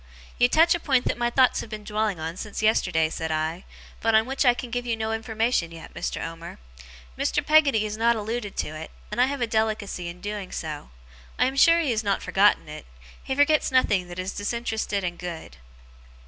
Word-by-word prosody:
'You 245 0 +5
touch 330 +4 +5
a 345 - -1
point 265 -6 +1
that - - 0
my 240 0 +1
thoughts 255 +1 +3
have - - -9
been 215 -1 -7
dwelling 210 -3 -1
on 160 +1 -4
since 210 +2 -6
yesterday,' 180 -7 +2
said 160 -1 -3
I, 160 +3 -2 0.4
'but 225 -1 +2
on 220 0 +5
which 270 +2 -1
I 245 -1 +5
can 245 -1 -7
give 245 +1 -2
you 230 -1 0
no 220 0 -2
information 225 -5 -1
yet, 165 -1 -11
Mr. - - -3
Omer. 165 +1 -8 0.6
Mr. - - 0
Peggotty 290 -8 +4
has 215 0 -4
not 235 +1 +3
alluded 220 -1 -4
to - - -1
it, 155 +1 -7 0.2
and 245 - 0
I 255 - +5
have 280 -1 -3
a - - +3
delicacy 220 -5 -1
in 170 +1 -8
doing 205 0 -5
so. 150 - -5 0.5
I - - +3
am 265 +1 -1
sure 335 +5 +6
he 295 -6 0
has 220 -1 -1
not 200 -1 0
forgotten 200 -4 +3
it. 150 0 -9 0.4
He 265 - -2
forgets 290 +1 +3
nothing 205 -8 +2
that 175 0 -9
is 185 +1 -3
disinterested 220 -2 -2
and 175 -1 -4
good. 170 - -7
220 Hz, 215 wpm, -25 LUFS, 180-245 Hz, 0.6 s, sure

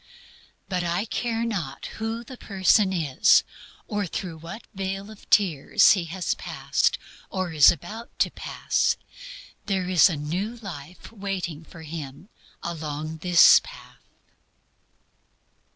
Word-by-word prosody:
But 180 -2 -1
I 175 +4 -1
care 230 0 -2
not 170 -12 -4
who 225 +1 -3
the 255 +2 -10
person 195 -2 +2
is, 155 -8 +4 0.4
or 205 -2 -2
through 165 -1 -5
what 170 +8 -9
vale 195 +1 -4
of 215 - -16
tears 190 0 +4
he 185 -4 +2
has 175 +2 -2
passed, - - 0 0.3
or 185 -3 -3
is 150 -3 +8
about 215 +7 -8
to - - +2
pass, - - 0 0.7
there 190 -3 0
is 180 -2 +6
a 170 - -2
new 180 +10 -3
life 180 -6 -10 0.6
for 165 -2 -12
him 155 +3 -8 0.3
along 155 -1 -5
this 175 +1 +7
path. - - -13
185 Hz, 120 wpm, -25 LUFS, 160-205 Hz, 0.7 s, is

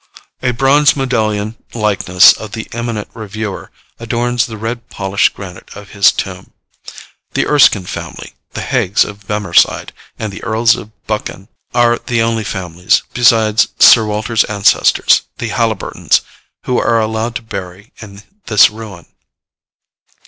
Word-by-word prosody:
A 125 - 0
bronze 135 +4 +3
medallion 110 -5 -2 0.2
likeness 100 -4 +4
of 110 -2 -10
the 115 - -5
eminent 115 -2 -4
reviewer 110 -2 -6 0.3
adorns 120 0 -1
the 110 -2 -8
red 115 +2 -6
polished 100 0 0
granite 95 -2 -10
of 105 -1 -12
his 100 -1 +4
tomb. 95 -1 -7 0.8
The - - +1
Erskine 130 -10 +4
family, - - -8 0.2
the - - -5
Haigs 95 +3 +1
of 105 -1 -11
Bemerside, 105 -4 +1 0.3
and 110 -2 -5
the - - -10
earls 115 0 +2
of 105 - -9 0.2
Buchan, 105 -3 -5 0.3
are 120 -1 +3
the 115 -2 -1
only 115 -1 -1
families, 90 -3 -1
besides 115 -3 +3
Sir 115 - +7
Walter's 110 +1 0
ancestors, 100 -1 +3 0.2
the 115 - -4
Haliburtons, 110 -4 0 0.4
who 125 - 0
are 115 +1 +1
allowed 110 +1 -2
to 115 - -5
bury 95 -1 -8
in 100 -2 -12 0.2
this 105 -1 +5
ruin. 105 -5 -10
110 Hz, 135 wpm, -15 LUFS, 100-115 Hz, 0.8 s, Sir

